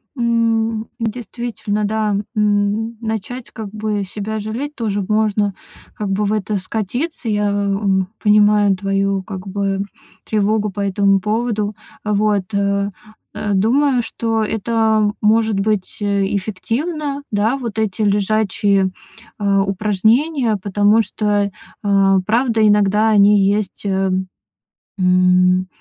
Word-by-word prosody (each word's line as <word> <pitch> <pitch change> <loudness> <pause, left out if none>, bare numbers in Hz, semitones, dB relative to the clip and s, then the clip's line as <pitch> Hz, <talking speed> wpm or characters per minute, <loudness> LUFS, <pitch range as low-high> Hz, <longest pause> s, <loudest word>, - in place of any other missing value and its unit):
М, 230 -2 0
действительно, 225 -2 -3
да, 215 -1 0 0.2
м, 210 +2 +1
начать 225 +2 -4
как 215 -3 -7
бы 215 -1 -2
себя 210 +3 -5
жалеть 240 +8 -5
тоже 210 -4 -2
можно 210 -2 +1 0.4
как 210 -2 -4
бы 200 +2 0
в 205 - 0
это 210 0 -1
скатиться. 230 - -3
Я, 205 -1 +1
м, 200 -2 0
понимаю 210 -1 +4
твою 195 0 0
как 195 -1 -8
бы 195 0 -1 0.5
тревогу 210 0 +1
по 200 +1 -5
этому 195 0 +2
поводу. 215 0 -1 0.3
А 210 - -1
вот, 205 -1 0
э, 200 0 0 0.4
э, 205 - -2
думаю, 250 +5 +2
что 225 -1 -1
это 220 -1 +1
может 215 -1 +2
быть 205 -2 -1
эффективно, 225 - -2
да, 215 +6 +1
вот 230 -4 -4
эти 215 -1 -1
лежачие, 200 -1 +1 0.5
а, 200 -1 +2
упражнения, 220 - +1
потому 205 +3 +3
что, 205 -2 0 0.3
а, 195 -1 +3
правда, 225 -1 +2
иногда 210 +1 +3
они 205 -1 +5
есть, 205 0 -2
ам, 190 -1 0 0.7
м, 185 0 +3
210 Hz, 120 wpm, -18 LUFS, 200-220 Hz, 0.7 s, они